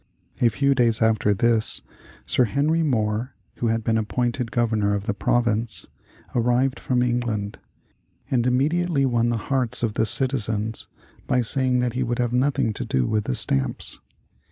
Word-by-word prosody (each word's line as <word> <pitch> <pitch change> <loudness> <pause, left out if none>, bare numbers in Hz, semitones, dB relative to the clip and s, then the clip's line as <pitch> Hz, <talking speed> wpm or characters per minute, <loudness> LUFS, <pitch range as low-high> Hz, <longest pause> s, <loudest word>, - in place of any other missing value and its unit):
A 120 - +5
few 140 +6 +1
days 120 -4 +2
after 110 -2 +2
this 110 +2 +2 0.4
Sir 125 - +3
Henry 145 +8 +1
Moore 115 -4 -1 0.2
(who 120 - -1
had 115 0 0
been 110 0 +1
appointed 120 +2 -2
Governor 110 -3 +1
of 100 0 -4
the 105 - -1
province) 115 -2 0 0.5
arrived 125 +2 +1
from 125 -1 0
England, 120 -4 -2 0.7
and 125 -2 +2
immediately 145 +4 +1
won 120 -2 +1
the 120 - 0
hearts 125 0 -1
of 110 -3 0
the 110 - +1
citizens 110 -5 0 0.4
by 125 - +2
saying 125 +1 +1
that 125 -2 -1
he 125 - -2
would 120 -1 -1
have 120 -1 -1
nothing 130 -3 +1
to - - -5
do 65 -1 0
with 105 - -1
the 65 - -1
stamps. 65 -1 +1
120 Hz, 160 wpm, -23 LUFS, 110-125 Hz, 0.7 s, A